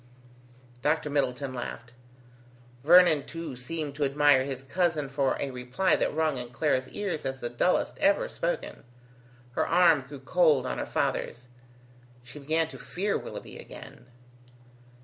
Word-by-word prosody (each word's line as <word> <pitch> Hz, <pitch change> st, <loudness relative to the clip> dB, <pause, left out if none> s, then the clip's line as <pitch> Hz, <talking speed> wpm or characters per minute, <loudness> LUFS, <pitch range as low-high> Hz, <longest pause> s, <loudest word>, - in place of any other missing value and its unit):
Dr. 150 Hz, +1 st, 0 dB
Middleton 135 Hz, -2 st, -1 dB
laughed. 120 Hz, -1 st, -7 dB, 0.9 s
Vernon 170 Hz, -2 st, +6 dB
too 165 Hz, -5 st, -6 dB
seemed 145 Hz, +4 st, -4 dB
to 145 Hz, +1 st, -2 dB
admire 140 Hz, -1 st, +4 dB
his 135 Hz, -1 st, -5 dB
cousin 160 Hz, -1 st, 0 dB
for 135 Hz, -1 st, 0 dB
a 140 Hz, -, -2 dB
reply 125 Hz, +9 st, +1 dB
that -, -, 0 dB
rung 155 Hz, -3 st, 0 dB
in 120 Hz, -1 st, -7 dB
Clara's 130 Hz, 0 st, 0 dB
ears 195 Hz, -7 st, -3 dB
as 135 Hz, 0 st, -4 dB
the 120 Hz, -1 st, -4 dB
dullest 150 Hz, +9 st, 0 dB
ever 305 Hz, +12 st, +3 dB
spoken. -, -, -4 dB, 0.7 s
Her -, -, -1 dB
arm 170 Hz, -4 st, +5 dB
grew 140 Hz, +1 st, -10 dB
cold 150 Hz, -2 st, +3 dB
on -, -, -3 dB
her -, -, -3 dB
father's. 125 Hz, +1 st, -2 dB, 0.7 s
She 125 Hz, +4 st, -11 dB
began 160 Hz, +3 st, 0 dB
to -, -, -11 dB
fear 200 Hz, +3 st, -2 dB
Willoughby -, -, -7 dB
again. -, -, -12 dB
145 Hz, 145 wpm, -28 LUFS, 130-165 Hz, 0.9 s, Vernon